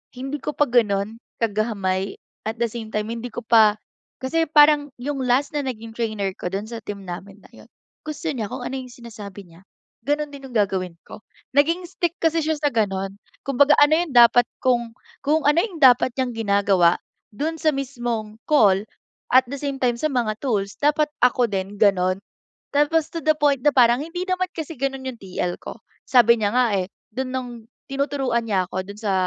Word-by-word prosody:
hindi 270 +3 -4
ko - - -4
pa 295 - +4
gano'n 220 -3 +1 0.2
kagamay 200 -3 -1 0.3
at 220 +2 -3
the 235 - +1
same 230 -1 -6
time 210 0 -1
hindi 235 +1 -5
ko 235 - -6
pa 220 -2 +5 0.5
kasi 325 +5 +1
parang 295 -1 +5
yung 280 +1 -3
last 255 +3 +2
na 295 - 0
naging 230 -3 -6
trainer 215 -4 -1
ko - - -4
do'n 195 +2 -4
sa 230 -1 -6
team 200 -1 -7
namin 190 +3 -8
na - - -18
'yun, - - -16 0.3
gusto 305 -1 -5
niya 220 -6 -4
kung 245 - -6
ano 265 - -4
yung 255 - -9
sinasabi 210 -5 -10
niya 165 +2 -18 0.4
gano'n 295 +1 0
din 275 -1 -9
yung - - -13
gagawin 190 -4 0
ko. - - -12 0.4
Naging 330 +5 +3
stick 345 -2 -1
kasi 325 0 +2
siya 315 +1 0
sa 295 -1 +1
gano'n, 195 -3 -1 0.3
kumbaga 275 +2 +4
ano 290 +1 +6
yung 340 -4 -2
dapat 240 0 +7 0.2
kung, 240 -3 +1 0.3
kung 310 +3 +3
ano 295 +2 +4
yung 360 -9 -6
dapat 250 -1 +6
niyang 255 -2 -1
ginagawa 200 -5 +3 0.4
do'n 315 +8 -3
sa 315 - +4
mismong 240 -5 -4
call, 205 -9 +4 0.5
at 255 - +8
the 280 - -4
same 275 -1 -4
time 240 -2 +1
sa 310 - -3
mga 240 -6 0
tools 205 -7 -1
dapat 295 +1 +2 0.2
ako 245 -2 +2
din 195 +1 -4
gano'n. 185 -2 +3 0.5
Tapos 295 +2 +2
to 330 - -3
the 310 -1 +2
point 290 -3 +2
na 295 - +3
parang 240 0 +5
hindi 335 +4 -4
naman 370 -1 -1
kasi 320 -1 -5
gano'n 270 -1 -2
yung 255 -3 -6
TL 180 -2 -4
ko. - - -8 0.3
Sabi 235 -2 +5
niya 205 - +2
nga, 245 -3 +3
eh, 180 - -4 0.2
do'n 260 +3 -3
nung 255 -1 -4 0.3
tinuturuan 270 -4 -1
niya 190 -3 +1
ako 185 +1 -4
do'n 200 - -8
sa 210 -3 -1
240 Hz, 195 wpm, -22 LUFS, 210-285 Hz, 0.5 s, at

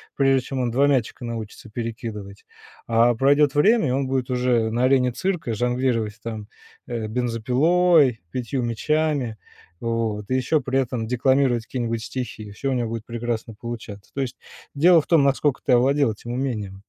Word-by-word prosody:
прежде 135 -1 +3
чем 135 -1 -3
он 120 -2 -1
2 140 +4 +3
мячика 130 -3 0
научится 115 -1 -7
перекидывать. 110 -3 -6 0.4
А 115 +1 +4
пройдет 140 +3 +3
время, 200 - +4
и - - 0
он 135 +1 0
будет 130 -1 -1
уже 125 -3 +1
на 120 +2 +1
арене 130 -1 +3
цирка 170 -4 -2
жонглировать 120 -2 -1
там, 110 -2 -6 0.4
э, 115 -3 -3
бензопилой, 125 - +2
5 125 +1 -2
мячами, 135 0 0 0.4
вот, 115 -3 -2
и - - +3
еще 130 +4 +1
при 135 +1 0
этом 125 -3 -2
декламировать 125 -1 +2
какие-нибудь 115 -3 -3
стихи. 115 -4 -6
Всё 135 +6 -3
у - - +1
него 120 -3 -1
будет 115 -1 -5
прекрасно 115 -1 -4
получаться. 115 -4 -8
То 140 - -1
есть 125 -3 -4 0.4
дело 165 +3 +5
в - - -16
том, 165 -4 +4
наскока 140 0 +1
ты - - +2
овладел 135 +1 +3
этим 120 +3 -8
умением. 110 -7 -3
125 Hz, 165 wpm, -23 LUFS, 115-135 Hz, 0.4 s, дело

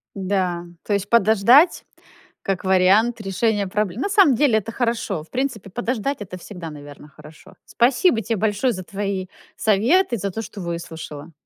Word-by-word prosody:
Да, 185 -3 -1 0.2
то 210 - -2
есть 200 0 -1
подождать- 235 - +5 0.6
как 195 -1 -2
вариант 195 +5 +3
решения 205 +1 0
пробле 205 0 -2
На 275 - 0
самом 390 -8 +5
деле, 250 -2 +3
это 220 +2 -8
хорошо. 225 -8 -2
В 160 - -21
принципе, 250 -6 -3
подождать- 245 +5 -2
это 185 -2 -7
всегда, 180 -2 -9
наверно, 145 0 -12
хорошо. 150 +2 -16
Спасибо 245 +1 +2
те 225 +2 -2
большое 215 +5 +1
за 185 - -6
твои 195 0 -4 0.3
советы, 235 - +2
за 200 -1 -3
то, 220 - -4
что 210 -2 -9
выслушала. 165 -3 -7
205 Hz, 155 wpm, -21 LUFS, 185-235 Hz, 0.6 s, подождать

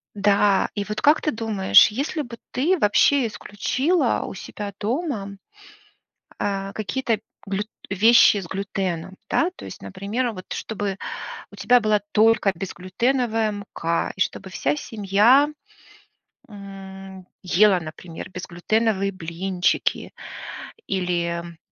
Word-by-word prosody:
Да, 200 -1 +3
и 205 - -1
вот 210 +1 -4
как 300 +2 +5
ты 305 - 0
думаешь, 220 -4 +5
если 280 +8 -2
бы 240 -4 -8
ты 330 +9 +2
вообще 265 +3 +4
исключила 255 - 0
у - - -7
себя 205 +1 -6
дома 215 - -2 1.0
э, 195 -1 -2
какие-то 225 +1 -1 0.3
глют 200 +1 -2 0.2
вещи 215 +2 +6
с 190 - -5
глютеном, 190 -2 -3
да? 340 +3 +2
То - - -10
есть, - - -9
например, 210 +6 -2
вот, 185 -2 -9
чтобы 205 -3 -3 0.6
у - - -12
тебя 245 0 +4
была 215 -1 +2
только 220 -2 +4
безглютеновая 220 +5 -1
мука, 185 -5 -2
и - - -9
чтобы 190 0 -1
вся 145 -5 0
семья, 220 - +3 1.0
м, 195 -2 -10 0.2
ела, 190 +1 +4
например, 160 +2 -9
безглютеновые 195 +3 -1
блинчики 180 +1 -1 0.8
или 170 -2 -2
200 Hz, 115 wpm, -23 LUFS, 190-225 Hz, 1.0 s, вещи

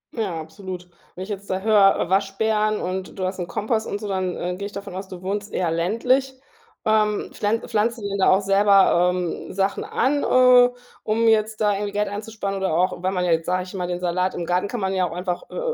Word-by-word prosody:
Ja, 200 -8 -2
absolut. 180 +3 -8 0.3
Wenn 185 - -6
ich 195 - -10
jetzt 200 -1 -6
da 190 0 -1
höre, 205 -4 +4
Waschbären 210 +2 +1
und 185 +2 -4
du 185 - -2
hast 185 +1 -3
'n 175 - -3
Kompost 220 +1 -1
und 205 - -3
so, 210 - -6
dann, 185 -2 -2
äh, 180 +1 -3
gehe 200 - -4
ich 205 - -11
davon 200 -1 -7
aus, 190 0 -6
du 185 -1 -9
wohnst 205 +2 -3
eher 175 -3 -1
ländlich? 250 +10 0 0.5
Ähm, 215 -1 +1
pflan 215 +2 0
pflanzt 230 +1 0
ihr 205 -2 -5
denn 200 0 -3
da - - +4
auch 190 +1 +4
selber, 195 -3 +4
ähm, 180 -2 -4
Sachen 195 +1 0
an, 285 +3 0
äh, 250 -1 +6 0.3
um 225 +2 +1
jetzt 215 0 +1
da 210 -1 +3
irgendwie 200 0 -3
Geld 210 0 0
einzusparen 205 -1 -4
oder 190 -4 -1
auch, 180 0 0
wenn 185 +1 -1
man 180 -1 0
jetzt, 165 -2 +1
sage 185 0 0
ich 185 - -11
mal, 180 -2 -3
den 180 0 -4
Salat 180 +1 0
im 170 - -3
Garten 180 +3 0
kann 230 +1 -4
man 190 0 -1
ja 185 -2 +1
auch - - -8
einfach, 180 0 -4
äh, - - -5
195 Hz, 235 wpm, -23 LUFS, 185-215 Hz, 0.5 s, äh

